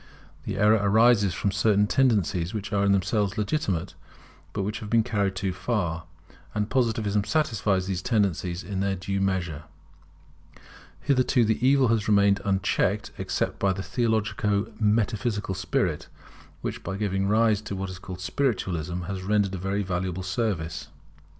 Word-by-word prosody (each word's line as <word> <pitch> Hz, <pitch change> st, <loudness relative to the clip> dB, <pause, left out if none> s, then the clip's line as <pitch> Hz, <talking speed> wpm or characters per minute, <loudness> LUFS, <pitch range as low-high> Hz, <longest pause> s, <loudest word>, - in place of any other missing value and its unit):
The -, -, -3 dB
error 105 Hz, +2 st, +4 dB
arises 105 Hz, -2 st, +4 dB
from 100 Hz, -, 0 dB
certain 105 Hz, +1 st, +3 dB
tendencies 105 Hz, -7 st, +1 dB
which 105 Hz, 0 st, -4 dB
are 100 Hz, 0 st, +2 dB
in 100 Hz, -, +3 dB
themselves 100 Hz, +1 st, +1 dB
legitimate, 100 Hz, -, -1 dB, 0.6 s
but 100 Hz, -, -2 dB
which 105 Hz, +2 st, -3 dB
have 105 Hz, -, -7 dB
been 115 Hz, 0 st, +4 dB
carried 100 Hz, -5 st, -1 dB
too 95 Hz, -1 st, -2 dB
far; 90 Hz, -5 st, -2 dB, 0.5 s
and 105 Hz, 0 st, -1 dB
Positivism 110 Hz, -5 st, +1 dB
satisfies 105 Hz, -, 0 dB
these 95 Hz, -1 st, -2 dB
tendencies 95 Hz, -5 st, 0 dB
in 95 Hz, +2 st, -4 dB
their 100 Hz, 0 st, 0 dB
due 95 Hz, +1 st, -3 dB
measure. 90 Hz, -6 st, -1 dB, 1.4 s
Hitherto 130 Hz, -3 st, +2 dB
the 110 Hz, +2 st, 0 dB
evil 135 Hz, -1 st, +4 dB
has 115 Hz, -2 st, +1 dB
remained 100 Hz, -1 st, +4 dB
unchecked, 100 Hz, +2 st, 0 dB
except -, -, -2 dB
by 100 Hz, -1 st, +2 dB
the 95 Hz, +1 st, -5 dB
theologico 105 Hz, -1 st, 0 dB
metaphysical 105 Hz, -1 st, 0 dB
spirit, 90 Hz, -3 st, -1 dB, 0.5 s
which, -, -, -4 dB
by 95 Hz, +2 st, -4 dB
giving 95 Hz, -2 st, -1 dB
rise 110 Hz, 0 st, +3 dB
to 110 Hz, -2 st, -5 dB
what 95 Hz, 0 st, -4 dB
is 90 Hz, -, -9 dB
called 90 Hz, -1 st, -8 dB
Spiritualism, 90 Hz, -, -1 dB
has 95 Hz, +2 st, -5 dB
rendered 100 Hz, 0 st, +1 dB
a 95 Hz, -, -4 dB
very 95 Hz, +2 st, -1 dB
valuable 90 Hz, 0 st, -3 dB
service. 90 Hz, -5 st, -2 dB
100 Hz, 150 wpm, -26 LUFS, 95-110 Hz, 1.4 s, error